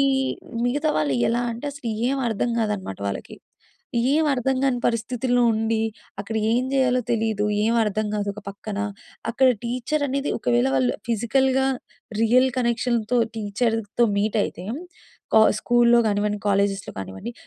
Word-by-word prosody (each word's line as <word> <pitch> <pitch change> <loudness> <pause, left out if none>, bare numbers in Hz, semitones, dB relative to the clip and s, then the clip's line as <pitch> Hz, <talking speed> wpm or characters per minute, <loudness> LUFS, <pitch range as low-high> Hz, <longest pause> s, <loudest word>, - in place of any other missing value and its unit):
ఈ - - +5 0.6
మిగతా 290 +5 0
వాళ్ళు 145 -4 +1
ఎలా 240 +1 +1
అంటే, 235 +5 -6
అసల 285 -4 -9 0.2
ఏం 275 - 0
అర్థం 225 +2 -1
కాదన్నమాట 205 - -2
వాళ్ళకి. 100 - -6 0.8
ఏమి 310 0 +3
అర్థం 265 0 0
కాని 260 -3 +2
పరిస్థితుల్లో 245 +2 0
ఉండి, 220 0 0 0.4
అక్కడ 210 +2 -6 0.2
ఏం 245 +2 +2
చేయాలో 255 -2 +3
తెలీదు, 220 -2 0 0.2
ఏం 230 +2 +2
అర్థం 215 0 -1
కాదు. 205 -1 -1
ఒక 210 - -8
పక్కన 200 +1 -6 0.5
అక్కడ 260 +2 +4
టీచరనేది 275 +3 -1
ఒకవేళ 120 - +2
వాళ్ళు 130 -2 +2 0.2
ఫిజికల్‌గా 265 +4 +2 0.5
రియల్ 250 +3 +4
కనెక్షన్‌తో 235 -1 0 0.2
టీచర్లతో 225 +1 0
మీటయితే! 205 -3 -1 0.7
కొ 220 - +8 0.2
స్కూల్‌లో 240 0 +4
కానివ్వండి, 210 0 0
కాలేజెస్‌లో 200 -1 0
కానివ్వండి, 95 - -6
230 Hz, 130 wpm, -23 LUFS, 205-250 Hz, 0.8 s, కొ